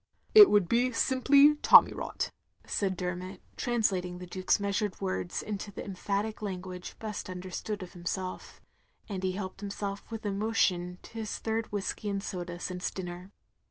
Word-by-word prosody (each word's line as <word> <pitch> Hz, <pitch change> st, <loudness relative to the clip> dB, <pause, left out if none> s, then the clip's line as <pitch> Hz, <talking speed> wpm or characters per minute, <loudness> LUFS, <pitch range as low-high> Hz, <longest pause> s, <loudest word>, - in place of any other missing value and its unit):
" -, -, -44 dB
" -, -, -33 dB
It 410 Hz, -, +12 dB
wotdd 205 Hz, -4 st, +3 dB
be 245 Hz, +5 st, +2 dB
simply 275 Hz, +4 st, +5 dB
tommy -, -, +8 dB
rot, -, -, -3 dB, 0.2 s
" -, -, -46 dB
said 190 Hz, -3 st, -1 dB
Dermot, 180 Hz, +1 st, -4 dB, 0.2 s
translating 190 Hz, -7 st, 0 dB
the 180 Hz, -, -8 dB
Duke's 185 Hz, +1 st, +1 dB
meastired 200 Hz, 0 st, -1 dB
words 95 Hz, -1 st, -2 dB
into 205 Hz, -1 st, -5 dB
the -, -, -7 dB
emphatic 200 Hz, +3 st, -2 dB
language 185 Hz, -3 st, -6 dB
best 210 Hz, -3 st, -5 dB
understood 185 Hz, +3 st, -5 dB
of 180 Hz, -, -11 dB
himself; 185 Hz, +1 st, -5 dB, 0.5 s
and 195 Hz, -3 st, -4 dB
he 185 Hz, -1 st, 0 dB
helped 190 Hz, 0 st, -5 dB
himself 200 Hz, 0 st, -5 dB
with 225 Hz, -1 st, -6 dB
emotion 195 Hz, -4 st, +1 dB
to -, -, -13 dB
his 215 Hz, -1 st, -3 dB
third 225 Hz, 0 st, -2 dB
whiskey 205 Hz, +1 st, -3 dB
and 200 Hz, -1 st, -2 dB
soda 175 Hz, -3 st, -5 dB
since 180 Hz, 0 st, -3 dB
dinner. 180 Hz, 0 st, -7 dB
195 Hz, 165 wpm, -30 LUFS, 180-215 Hz, 0.5 s, It